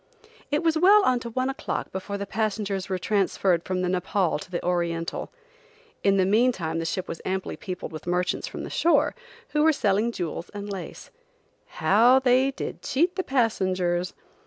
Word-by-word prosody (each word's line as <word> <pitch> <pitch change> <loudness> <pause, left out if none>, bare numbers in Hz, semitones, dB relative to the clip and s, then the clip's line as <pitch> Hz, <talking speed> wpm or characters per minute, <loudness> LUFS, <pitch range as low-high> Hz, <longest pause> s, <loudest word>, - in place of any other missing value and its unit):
It 295 +3 0
was 325 -1 +2
well 400 +4 +7
on 255 -6 +3
to 235 - -6
one 255 +3 -1
o'clock 270 +1 -3
before 195 +2 -4
the 200 - -4
passengers 205 -2 -2
were 190 - 0
transferred 190 -2 +1
from 185 -1 -2
the - - +1
Nepaul 185 0 0
to 195 - -10
the 175 -1 -4
Oriental. 170 -1 -2 0.7
In 195 0 +4
the 190 - +3
meantime 195 -6 +1
the 165 - -3
ship 180 +2 -2
was 165 - -6
amply 190 0 -3
peopled 185 -2 -6
with 155 +1 -9
merchants 180 +1 0
from - - -6
the - - -7
shore, 340 - +3 0.4
who 300 - +1
were 320 +1 +6
selling 215 -4 +1
jewels 175 -4 -5
and 205 0 -5
lace. 190 -3 -8 0.6
How 235 +6 +4
they 260 0 +3
did 275 - -6
cheat 345 +6 +1
the 375 - -1
passengers! 185 - 0
195 Hz, 180 wpm, -25 LUFS, 180-250 Hz, 0.7 s, well